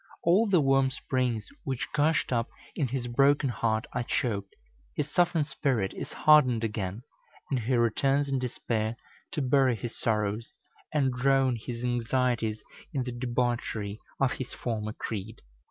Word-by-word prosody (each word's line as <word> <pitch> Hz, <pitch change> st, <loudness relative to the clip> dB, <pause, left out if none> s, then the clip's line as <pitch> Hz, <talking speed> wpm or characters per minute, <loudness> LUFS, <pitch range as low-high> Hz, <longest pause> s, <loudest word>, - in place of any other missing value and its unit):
All 190 Hz, +7 st, +4 dB
the 180 Hz, -5 st, +5 dB
warm 135 Hz, -1 st, +4 dB
springs 125 Hz, -5 st, -1 dB, 0.2 s
which 135 Hz, -2 st, -2 dB
gushed 150 Hz, -2 st, +2 dB
up 115 Hz, -1 st, 0 dB, 0.3 s
in 140 Hz, -, 0 dB
his 125 Hz, 0 st, -3 dB
broken 135 Hz, +3 st, +3 dB
heart 110 Hz, 0 st, 0 dB
are -, -, 0 dB
choked, 100 Hz, -5 st, -2 dB, 0.4 s
his 150 Hz, 0 st, -2 dB
softened 175 Hz, -3 st, +3 dB
spirit 130 Hz, -9 st, 0 dB
is -, -, -6 dB
hardened 130 Hz, -7 st, +5 dB
again, 105 Hz, 0 st, -3 dB, 0.5 s
and 135 Hz, -, +2 dB
he 120 Hz, +3 st, 0 dB
returns 135 Hz, +5 st, +2 dB
in 135 Hz, -1 st, 0 dB
despair 115 Hz, -3 st, -2 dB, 0.4 s
to 150 Hz, -, -1 dB
bury 130 Hz, -1 st, +4 dB
his 115 Hz, +2 st, -6 dB
sorrows 105 Hz, 0 st, -1 dB, 0.4 s
and 135 Hz, -4 st, +2 dB
drown 135 Hz, 0 st, +3 dB
his 115 Hz, +1 st, -6 dB
anxieties 120 Hz, -2 st, 0 dB, 0.3 s
in 135 Hz, -3 st, -1 dB
the 125 Hz, -, -4 dB
debauchery 120 Hz, -4 st, -2 dB, 0.2 s
of 135 Hz, -1 st, +3 dB
his 130 Hz, -1 st, -5 dB
former 110 Hz, -3 st, -3 dB
creed. 110 Hz, 0 st, -6 dB
125 Hz, 150 wpm, -29 LUFS, 115-135 Hz, 0.5 s, the